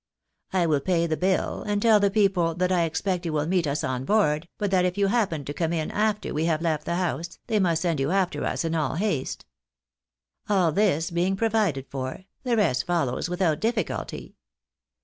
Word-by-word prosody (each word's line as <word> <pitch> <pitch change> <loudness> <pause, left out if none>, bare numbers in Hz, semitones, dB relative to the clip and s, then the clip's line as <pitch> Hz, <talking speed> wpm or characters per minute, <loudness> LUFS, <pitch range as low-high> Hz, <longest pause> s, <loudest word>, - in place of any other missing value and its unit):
I 185 -2 +2
will 155 -3 +2
pay 170 +2 +1
the 160 -1 0
bill, 185 +3 0
and 205 -1 -1
tell 220 0 +5
the 200 0 +3
people 195 -5 +2
that 180 +1 0
I 175 -2 +3
expect 180 +3 -2
you 165 -3 -3
will 150 -1 0
meet 175 -1 +1
us 140 +1 -1
on 130 0 -2
board, 165 -3 +2
but 205 -2 -1
that 185 -2 +3
if 180 +1 -1
you 200 - +3
happen 195 - 0
to 145 - -4
come 165 +1 -1
in 160 -2 -2
after 210 0 0
we 155 +2 0
have 165 -1 0
left 155 -3 0
the 170 - -1
house, 170 -1 -2
they 215 - +1
must 170 -3 +1
send 165 -5 0
you 135 +1 0
after 190 0 0
us - - -1
in 165 - -1
all 155 -2 0
haste. 170 -7 -2 1.0
All 185 -5 +3
this 165 -3 +1
being 180 +3 +1
provided 205 -10 0
for, 130 +6 -5 0.2
the 240 -2 0
rest 130 - +1
follows 165 -3 0
without 175 -4 +1
difficulty. 225 +1 -3
175 Hz, 205 wpm, -25 LUFS, 155-195 Hz, 1.0 s, tell